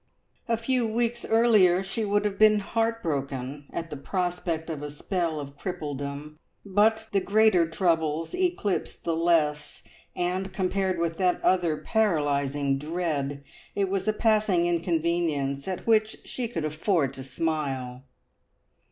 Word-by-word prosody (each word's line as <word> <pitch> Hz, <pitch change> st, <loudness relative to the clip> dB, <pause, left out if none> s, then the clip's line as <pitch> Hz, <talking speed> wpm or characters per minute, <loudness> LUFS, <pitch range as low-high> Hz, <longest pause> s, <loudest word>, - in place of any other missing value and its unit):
A 230 Hz, -1 st, +1 dB
few 240 Hz, +1 st, 0 dB
weeks 235 Hz, +1 st, -1 dB
earlier 215 Hz, -6 st, +4 dB
she 195 Hz, +4 st, -3 dB
would 205 Hz, +1 st, +1 dB
have 200 Hz, -1 st, -2 dB
been 215 Hz, 0 st, +6 dB
heartbroken 145 Hz, -, -2 dB
at 165 Hz, -1 st, -5 dB
the -, -, -4 dB
prospect 175 Hz, +1 st, -2 dB
of 155 Hz, -3 st, -5 dB
a 145 Hz, -, -5 dB
spell 165 Hz, +1 st, -2 dB
of 140 Hz, -1 st, -8 dB
crippledom, 150 Hz, -3 st, -5 dB, 0.3 s
but 220 Hz, +3 st, +2 dB
the 200 Hz, -, +3 dB
greater 200 Hz, -5 st, +4 dB
troubles 165 Hz, -2 st, 0 dB
eclipse 360 Hz, -, -1 dB
the 165 Hz, -, -3 dB
less, 155 Hz, -3 st, +1 dB, 0.3 s
and 185 Hz, +2 st, -1 dB
compared 190 Hz, 0 st, 0 dB
with 165 Hz, -1 st, -1 dB
that 180 Hz, -2 st, +2 dB
other 175 Hz, -4 st, +2 dB
paralysing 145 Hz, -, +1 dB
dread, 150 Hz, -3 st, -2 dB, 0.3 s
it 195 Hz, -2 st, 0 dB
was 195 Hz, +1 st, -2 dB
a -, -, +5 dB
passing 210 Hz, -5 st, +2 dB
inconvenience 165 Hz, -5 st, 0 dB
at 185 Hz, -1 st, -4 dB
which 220 Hz, -1 st, +2 dB
she 250 Hz, -2 st, -3 dB
could 165 Hz, -9 st, -3 dB
afford 155 Hz, -2 st, 0 dB
to 135 Hz, -, -8 dB
smile. 135 Hz, -3 st, -3 dB
175 Hz, 135 wpm, -27 LUFS, 150-205 Hz, 0.3 s, been